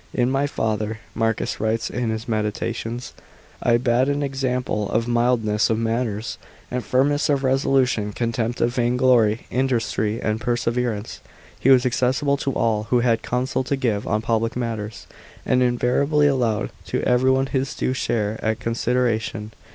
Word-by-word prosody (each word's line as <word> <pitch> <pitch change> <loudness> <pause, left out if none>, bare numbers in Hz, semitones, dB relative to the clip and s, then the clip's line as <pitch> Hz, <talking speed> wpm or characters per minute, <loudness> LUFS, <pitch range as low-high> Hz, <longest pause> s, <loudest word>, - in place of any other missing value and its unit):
" - - -30
In 125 - +2
my 135 +1 +1
father," 110 -3 -2 0.2
Marcus 115 -1 -1
writes 110 +1 0
in 125 -2 -2
his 110 0 -3
Meditations, 115 +2 -3 0.2
" - - -27
I 120 - +5
bad 125 +2 +2
an 145 0 0
example 125 -6 -1
of 115 +1 0
mildness 120 -3 +2
of 110 - +1
manners 115 -1 -2 0.3
and 125 0 -2
firmness 145 +4 +1
of 140 -2 +2
reso 135 0 +1
lution, 125 -6 +1
contempt 115 0 -1
of 120 +1 +2
vain 120 0 +1
glory, 120 -4 +3
industry 115 -4 0
and 110 +1 -1
pe> 120 +1 +1
severance. 120 -2 -2 0.4
He 135 - +2
was 130 -1 +6
accessible 130 +3 +1
to 140 - -2
all 110 -3 0
who 120 +2 +2
had 115 -2 +2
counsel 130 +2 -1
to 140 - 0
give 115 -6 -1
on 110 +1 0
public 115 0 0
matters, 110 -4 -4 0.4
and 125 - +2
invariably 125 +4 +2
allowed 125 -7 +1 0.2
to - - -2
everyone 130 +2 +3
his 135 0 -2
due 130 - -1
share 110 -4 -1
ot 110 0 +1
C"nsideration. 115 -1 -1
120 Hz, 165 wpm, -22 LUFS, 110-130 Hz, 0.4 s, was